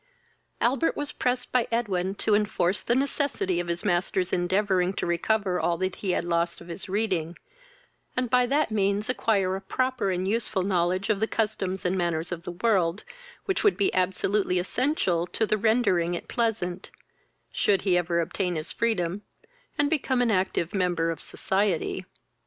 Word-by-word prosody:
Albert 260 +6 +1
was 290 0 -2
pressed 250 0 -1
by 250 -2 +2
Edwin 195 -5 0
to 210 - +1
enforce 205 -3 +1
the 240 - +1
necessity 270 - 0
of 175 - -3
his 170 +4 -2
master's 180 0 0
endeavouring 185 0 +1
to - - -3
recover 185 +2 0
all 170 -1 +1
that 185 +1 -2
he 195 - -4
had 180 - 0
lost 170 0 0
of 170 - -13
his 180 +3 -6
reading, 185 -5 -1 0.8
and 255 0 +1
by 250 +1 +3
that 285 -1 +1
means 200 +1 0
acquire 200 -7 +1
a 195 - -5
proper 255 -3 -1
and 185 0 -1
useful 215 -3 0
knowledge 185 +1 +1
of 205 - 0
the 220 - +1
customs 200 -5 -2
and 180 +1 +1
manners 170 -1 -1
of 170 -1 -4
the 175 - -6
world, 190 -5 +2 0.4
which 385 - 0
would 415 - +4
be 200 - +1
absolutely 185 +1 +1
essential 180 - 0
to 220 - 0
the 215 - +1
rendering 210 -6 +2
it - - -7
pleasant, 205 -6 -1 0.6
should 195 -3 +1
he 190 -3 +3
ever 170 -1 +1
obtain 180 +1 -2
his 155 -1 -3
freedom, 200 -5 0 0.6
and 290 - +3
become 270 -5 +1
an 245 -2 +2
active 185 -3 0
member 175 -4 +1
of 165 - -6
society. 190 -2 -1
190 Hz, 170 wpm, -26 LUFS, 175-225 Hz, 0.8 s, would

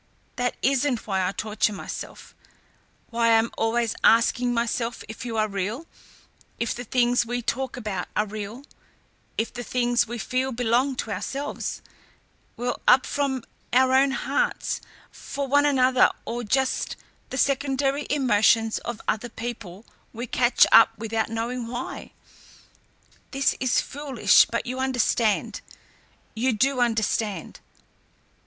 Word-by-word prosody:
That 245 -1 -1
isn't 265 -2 +1
why 190 -3 0
I - - -1
torture 210 +1 -1
myself, - - -8 0.8
why 230 0 +1
I - - +5
am 225 +1 +3
always 225 0 0
asking 240 +2 +4
myself 235 0 -1
if 220 +3 -7
you 225 -1 -3
are 215 0 +2
real, 205 - -3 0.7
if 235 - -1
the 245 - -6
things 245 0 +2
we 245 +1 -3
talk 265 +2 -2
about 210 -6 -4
are 210 - +2
real, 215 +4 -7 0.7
if 225 - -1
the 245 - -5
things 240 -1 +1
we 240 +1 -5
feel 255 +3 -1
belong 245 +3 +1
to 225 - -4
ourselves, 275 +7 -4 0.7
well 245 +1 -3
up 255 +1 +6
from 270 -4 -1 0.3
our 260 +1 +4
own 270 +1 +5
hearts 485 - -1 0.3
for 280 0 -5
one 285 +2 +4
another 260 -2 +4 0.2
or 240 +1 -3
are - - -7
just 265 +5 0 0.3
the 260 - -5
secondary 275 +1 0
emotions 225 -5 +3
of 240 -2 -6
other 225 +3 -1
people 225 -4 -7 0.3
we 235 +2 -5
catch 245 0 +4
up 225 0 +7
without 225 0 -2
knowing 230 +2 -3
why. 245 +2 -6 1.2
This 275 -1 +1
is 255 -1 +2
foolish, 275 -4 +3
but 235 - -3
you 255 +1 -4
understand 245 -4 0 0.7
you 240 +3 +1
do 260 +5 +1
understand. 220 -5 -1
240 Hz, 135 wpm, -25 LUFS, 225-260 Hz, 1.2 s, up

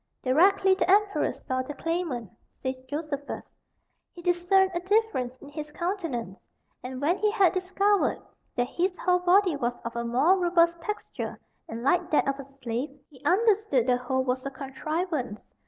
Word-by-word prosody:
"Directly 380 +8 +4
the 375 - 0
emperor 405 +1 +3
saw 255 0 -3
the 280 +3 -7
claimant," 330 - -3 0.3
says 260 -1 0 0.2
Josephus, 290 -1 -4 0.7
"he 345 - -12
discerned 360 +2 +3
a 345 - 0
difference 375 - 0
in 285 - -12
his 300 +1 -7
countenance; 320 - -3 0.4
and 255 0 -6
when 335 +7 +1
he 425 +1 +3
had 400 -5 +3
discovered 390 +2 +1 0.4
that 245 - +1
his 360 +7 -1
whole 360 +1 +2
body 360 -1 +4
was 240 -3 -1
of 235 - -5
a 235 - -1
more 270 +11 +3
robust 340 -1 +3
texture 420 +5 -5 0.3
and 230 +1 -5
like 345 +5 +2
that 300 - +2
of 275 0 -1
a - - -5
slave, 260 0 -4 0.2
he 265 -1 -18
understood 400 - +3
the 250 -1 +3
whole 260 +1 -1
was 255 0 -1
a 275 - -3
contrivance." 275 - -4
315 Hz, 165 wpm, -27 LUFS, 260-370 Hz, 0.7 s, Directly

